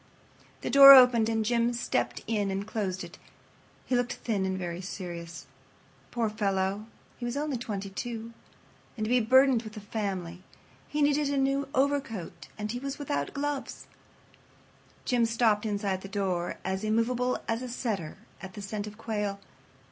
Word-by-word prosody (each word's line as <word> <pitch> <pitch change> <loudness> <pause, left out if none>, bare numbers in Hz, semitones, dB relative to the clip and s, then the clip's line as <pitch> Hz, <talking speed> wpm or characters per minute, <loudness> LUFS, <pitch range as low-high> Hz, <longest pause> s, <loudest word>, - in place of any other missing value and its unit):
The - - -3
door 275 0 +11
opened 250 -4 +7
and 225 -1 0
Jim 235 +1 +2
stepped 240 - -2
in 210 -3 0
and 195 +1 -3
closed 195 -4 -3
it. - - -11 0.7
He 255 - 0
looked 245 0 0
thin 200 -5 -2
and 190 0 -2
very 175 -1 -4
serious. 170 -3 -7 0.6
Poor 235 -2 -1
fellow, 200 -1 -1 0.3
he - - -8
was 240 +3 -3
only 295 -1 -1
twenty 205 -5 -5
two—and 230 0 -8
to - - -3
be 250 +1 +4
burdened 260 +1 +5
with 215 -1 -10
a - - -4
family! 195 -5 -4 0.5
He 295 0 0
needed 290 0 +2
a 285 - 0
new 275 +1 +1
overcoat 270 -9 -1
and 210 0 -3
he 245 - -4
was 275 +1 -5
without 145 - -3
gloves. 285 -1 -3 1.2
Jim 245 -2 +2
stopped 225 -2 +2
inside 200 -2 -1
the 195 - -8
door, 190 -4 -2
as 190 +2 -2
immovable 235 +3 +1
as 225 +1 -1
a 255 - -5
setter 215 - -3 0.2
at 190 0 -8
the 205 - -7
scent 205 +1 -4
of 210 0 -10
quail. 210 -3 -3
220 Hz, 165 wpm, -28 LUFS, 195-250 Hz, 1.2 s, door